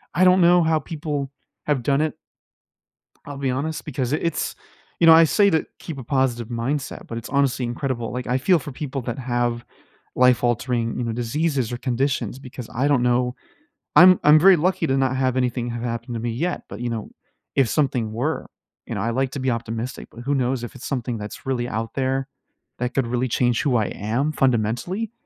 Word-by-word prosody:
I 185 - +4
don't 185 0 +6
know 175 0 +6
how 160 -1 +2
people 150 -4 -4 0.4
have 145 -5 +1
done 140 +3 +2
it. 155 -1 -1 1.1
I'll 145 - -7
be 135 -1 0
honest 145 +5 -3
because 135 -3 -3
i - - +3
it's 165 0 -2 0.5
you 165 - +6
know, - - +11
I 165 +1 +8
say 200 +5 +4
to 160 -3 +1
keep 160 -5 -7
a 130 - -7
positive 125 -3 0
mindset, 130 +4 -3
but 115 - -4
it's 115 - -8
honestly 140 -3 +1
incredible. 120 -2 -3
Like, 125 +1 -4
I 125 +1 +2
feel 170 +5 +3
for 145 - -7
people 135 0 -5
that 120 +1 -4
have 120 -1 -1 0.5
life-altering, 120 -1 +2
you 125 - -2
know, 115 - -2
diseases 125 +2 -1
or 120 - -3
conditions 130 +1 -1
because 130 -3 -9
I 130 +4 +1
don't 140 -4 +3
know 125 0 +1 0.6
I'm 185 0 +8
I'm 150 +1 +7
very 190 +3 +7
lucky 175 0 +1
to 135 - +1
not 130 -1 +1
have 130 -1 +1
anything 125 -1 0
have 120 0 -4
happened 120 0 -4
to - - -2
me 115 +1 -2
yet, 165 +10 -2
but, - - -8
you 120 - -2
know, 115 -3 -5 0.4
if 135 -4 +3
something 125 -7 0
were, 130 +9 -2 0.4
you - - -4
know, 100 - -2
I 115 +3 0
like 130 +2 0
to 140 - -5
be 130 -1 0
optimistic. 115 +1 -4
But 120 - -11
who 140 +4 -1
knows 130 -2 0
if 120 - -6
it's 130 - -8
something 125 -4 -3
that's 105 0 -8
really 125 -2 -1
out 115 -1 -4
there 135 0 -1 0.5
that 125 +1 -2
could 135 - +2
really 125 +2 -1
change 120 0 +1
who 135 -4 +1
I 110 -3 +2
am 120 +9 -1
fundamentally. 130 - 0
130 Hz, 210 wpm, -23 LUFS, 120-145 Hz, 1.1 s, know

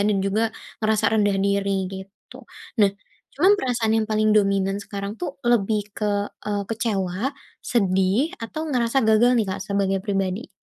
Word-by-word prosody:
dan 210 - +2
juga 200 +3 +1 0.4
ngerasa 215 -1 +1
rendah 205 -2 +2
diri, 200 0 +1 0.2
gitu. 190 +1 -11 0.4
Nah, 200 -2 +6 0.4
cuma 345 +7 +4
perasaan 240 - 0
yang 215 - -2
paling 215 0 +2
dominan 195 -1 +2
sekarang 200 0 -5
tuh 345 -6 -4
lebih 215 -2 +2 0.2
ke, 210 - -1 0.4
eee, 205 -1 -1
kecewa, 205 -5 -1 0.4
sedih, 195 - +1
atau 230 +7 -5
ngerasa 245 -1 0
gagal 220 +3 +5
nih, 220 -4 +2
Kak, 190 +1 -4
sebagai 195 0 0
pribadi? 195 +2 -2
205 Hz, 145 wpm, -23 LUFS, 195-225 Hz, 0.4 s, Nah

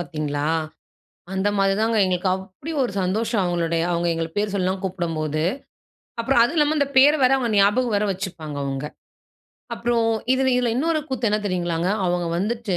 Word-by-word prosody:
பார்த்தீங்களா? 150 -4 -3 0.9
அந்த 190 +1 0
மாதிரி 195 0 +3
தாங்க 225 0 +1
எங்களுக்கு. 185 0 0
அப்படி 190 - -8
ஒரு 245 - -2
சந்தோஷம்! 215 +4 0
அவங்களுடைய 170 -2 0
அவங்க 170 0 0
எங்கள 165 0 -2
பேர் 205 -1 0
சொல்லலாம் 190 -1 0
கூப்பிடும்போது. 165 -5 -2 0.8
அப்புறம், 250 +1 +2
அதுவும் 290 +8 -1
இல்லாம 300 0 +3
அந்த 285 -1 +2
பேரை 290 +3 +7
வேற 255 - +5
அவங்க 245 -3 -1
ஞாபகம் 210 +4 +3
வேற 205 +1 +1
வச்சுப்பாங்க 175 -6 -6
அவங்க. 135 +1 -3 0.9
அப்புறம் 235 -1 0 0.3
இதில 260 0 +2
இதில 245 -1 +1
இன்னொரு 315 +3 +1
கூத்து 255 -3 -1
என்ன 210 - +2
தெரியுங்களாங்க, 175 -2 -1 0.2
அவங்க 175 -1 0
வந்துட்டு, 215 -1 -2
195 Hz, 160 wpm, -22 LUFS, 175-235 Hz, 0.9 s, பேரை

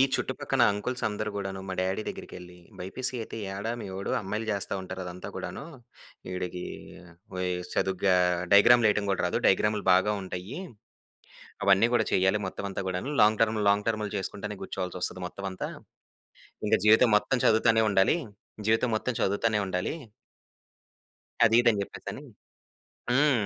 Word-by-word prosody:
చుట్టుపక్కల 135 -1 -1
అంకుల్స్ 120 +5 -4
అందరు 105 0 -3
గూడాను 95 -1 -4
మా - - -2
డ్యాడీ 95 +3 0
దగ్గరికేళ్లి 90 0 -8 0.2
బైపీసీ 125 +8 -4
అయితే 110 - -7 0.2
ఏడ 100 +2 -6 0.2
మీవోడు? 95 0 -5
అమ్మాయిలు 105 +3 -3
జేస్తా 100 -1 -3
ఉంటారు 95 0 -6
అదంతా 90 0 -7
గూడాను. - - -5 0.7
వీడికి 90 -1 -4 0.7
వి 90 - -2 0.3
చదువుగా 95 0 +2 0.4
డయాగ్రామ్‌లేయటం 105 -1 +6
గూడా 95 - +1
రాదు 90 - 0
డయాగ్రామ్లు 105 +1 +2
బాగా 95 +3 +3
ఉంటాయి. 95 +6 -6 1.1
అవన్నీ 100 +3 +5
గూడా 115 -2 +3
చేయాలి 95 +3 +3
మొత్తం 95 - -6
అంతా 95 - -4
గూడాను. 90 +10 -3
లాంగ్ 105 0 +4
టర్మ్, 110 -1 +2
లాంగ్ 100 +1 +1
టర్మ్‌లు 105 -2 -1
జేసుకుంటనే 100 +2 -5
కూర్చోవాల్సొస్తది 90 -1 -4
మొత్తం 100 +2 -7
అంతా. 95 - -5 1.0
ఇంక - - +3
జీవితం 110 +3 +6
మొత్తం 130 +5 +1
చదువుతానే 110 0 +4
ఉండాలి. 100 - +3 0.5
జీవితం 115 +3 +3
మొత్తం 125 +4 -2
చదువుతానే 105 +2 +1
ఉండాలి. 90 +5 -2 1.5
అదిదని 115 -1 +4
జేప్పేసని. - - -7 0.9
హ్మ్. 130 -5 +3
100 Hz, 130 wpm, -28 LUFS, 95-110 Hz, 1.5 s, డయాగ్రామ్‌లేయటం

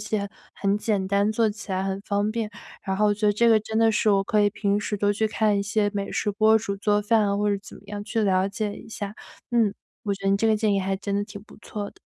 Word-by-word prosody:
且 210 -1 -2 0.3
很 200 0 +1
简 205 -3 0
单， 200 +2 +2
做 220 0 +2
起 210 -1 -9
来 190 0 0
很 195 0 -2
方 205 +1 -1
便。 220 -1 -3 0.3
然 190 -2 -2
后 210 - +2
我 205 - +4
觉 210 +1 -1
得 205 - +4
这 235 +3 +2
个 220 -2 +5
真 220 +1 -5
的 225 0 +4
是 215 - +1
我 195 -1 +3
可 215 - +2
以 205 - +4
平 205 0 0
时 210 0 -2
多 205 +1 +2
去 220 +1 0
看 210 -1 +1
一 - - 0
些 205 0 0
美 200 -1 -3
食 210 - -1
博主 215 -1 +3
做 205 +1 +1
饭 210 0 +3
啊， 200 - 0
或 210 0 +1
者 200 - 0
怎 - - -12
么 - - -16
样 205 0 -5
去 225 +1 -1
了 190 -1 +2
解 210 0 -3
一 - - -12
下。 205 -2 -6 0.4
嗯， 225 -4 +2 0.3
我 200 -2 -1
觉 195 0 -11
得 195 - +3
你 195 - +4
这 225 - +2
个 215 - +4
建 210 -1 +1
议 195 - +2
还 195 0 -1
真 200 0 -3
的 205 - +1
挺 205 -1 -10
不 - - -17
错 210 -1 -6
的。 - - -23
205 Hz, 315 characters per minute, -25 LUFS, 200-215 Hz, 0.4 s, 个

